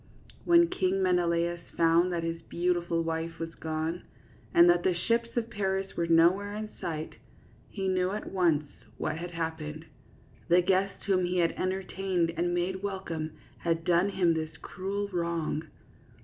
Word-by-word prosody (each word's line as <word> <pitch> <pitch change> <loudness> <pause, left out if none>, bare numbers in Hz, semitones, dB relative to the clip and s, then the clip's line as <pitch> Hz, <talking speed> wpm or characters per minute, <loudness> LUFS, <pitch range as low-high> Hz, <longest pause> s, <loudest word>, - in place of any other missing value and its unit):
When 340 0 +6
King 190 - 0
Menelaus 175 -1 +1 0.2
found 170 +2 +4
that 170 -1 -1
his 165 0 -3
beau 175 +2 0
tiful 170 -1 -1
wife 165 0 -3
was 165 0 -5
gone, 160 +2 -3 0.5
and 170 +1 +7
that 175 0 +5
the 180 0 +1
ships 230 +6 0
of 235 0 -1
Paris 195 -1 -2
were 170 - 0
nowhere 180 +5 +4
in 215 0 -5
sight, 155 -2 -4 0.5
he 195 -2 -3
knew 185 -1 +1
at 210 +2 -5
once 170 -6 +3 0.3
what 155 +1 -2
had 175 +1 -5
happened. 160 -2 -4 0.6
The 175 +1 +5
guest 195 +1 +1
whom 185 -2 +2
he 180 +1 -1
had 170 -1 +3
entertained 185 -2 -1
and 175 +2 0
made 180 +2 -1
welcome 170 -6 -4 0.3
had 165 -1 0
done 175 +2 +3
him 180 -4 +2
this 160 -1 -4
cruel 200 +2 -4
wrong. 170 -3 -2
175 Hz, 160 wpm, -29 LUFS, 165-190 Hz, 0.6 s, and